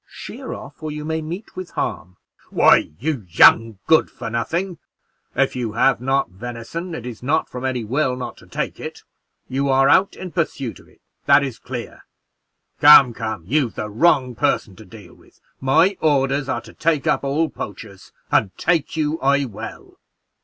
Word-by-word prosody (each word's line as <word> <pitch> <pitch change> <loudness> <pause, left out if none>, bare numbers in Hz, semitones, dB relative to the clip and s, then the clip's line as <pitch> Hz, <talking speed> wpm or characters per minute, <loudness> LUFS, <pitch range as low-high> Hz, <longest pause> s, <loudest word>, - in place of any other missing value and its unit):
Sheer - - -9
off, - - -9
or 155 - -4
you 150 0 -6
may 160 0 -2
meet 175 +7 -7
with 185 -1 -6
harm." 90 +2 -4 0.3
"Why, - - +4
you 145 -6 -2
young 110 +5 +5
good 160 0 +4
for 115 - -7
nothing, 170 +10 -2 0.6
if - - +1
you 120 -4 -3
have 125 +1 +2
not 135 +2 +1
venison, 120 - -6
it 120 - -7
is 120 -3 -7
not 145 +6 0
from 125 0 -8
any 130 -3 -1
will 130 +3 0
not 125 0 -6
to - - -17
take - - -4
it; - - -8 0.4
you 135 +2 -1
are 135 0 +4
out 190 +6 +4
in 185 -2 -8
pursuit 140 -8 -3
of - - -19
it, - - -25 0.3
that 145 - +6
is 130 -4 -5
clear. 125 -2 -8 0.7
Come, 140 -4 +8
come, 110 -7 -5
you've 130 - 0
the 105 0 -5
wrong 130 +1 +3
person 105 -3 -1
to 110 - -13
deal 100 -1 -14
with; - - -23 0.2
my 160 +9 +3
orders 140 -2 +1
are - - -1
to - - -14
take 160 -3 0
up - - +1
all 145 +4 +1
poachers, 100 -1 -9 0.2
and 95 -3 +1
take 165 -2 0
you 155 +1 0
I 140 +1 +2
will." 110 -6 -9
135 Hz, 180 wpm, -21 LUFS, 115-155 Hz, 0.7 s, Come